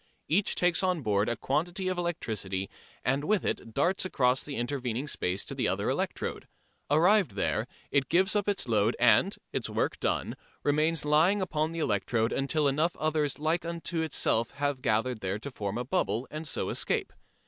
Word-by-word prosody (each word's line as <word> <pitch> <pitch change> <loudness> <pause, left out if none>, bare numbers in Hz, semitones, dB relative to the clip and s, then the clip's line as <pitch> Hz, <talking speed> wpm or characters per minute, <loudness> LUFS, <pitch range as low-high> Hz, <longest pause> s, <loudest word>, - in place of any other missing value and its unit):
Each 190 +6 +2
takes 175 -1 +2
on 180 -5 0
board 105 -1 +1
a 120 - 0
quantity 175 +9 -1
of 185 -1 -1
electricity 105 - -3 0.3
and 135 +3 +1
with 205 +3 +1
it 115 - -2
darts 175 +7 +2
across 130 -8 +2
the 145 - -5
intervening 125 +1 -2
space 95 -8 -1
to - - -5
the - - 0
other - - 0
electrode. - - -3 0.4
Arrived 175 - +4
there, 100 - 0 0.2
it 135 -2 +2
gives 190 +4 +3
up 205 0 +1
its 200 -9 0
load 110 0 +2
and, - - +4 0.2
its - - -2
work - - -1
done, - - -1 0.3
remains 155 +2 +2
lying 160 +7 +4
upon 160 -4 -1
the 165 - -6
electrode 115 -4 0
until 145 +2 +1
enough 155 +5 +1
others 155 -2 0
like 160 +3 0
unto 170 0 -3
itself 120 -7 +1
have 140 -2 -1
gathered 115 +1 +1
there 95 0 -2
to 140 +6 -7
form 105 -3 -4
a 125 - -3
bubble 120 -1 0
and 155 +1 -5
so - - -2
escape. - - -1
145 Hz, 180 wpm, -29 LUFS, 120-170 Hz, 0.4 s, Arrived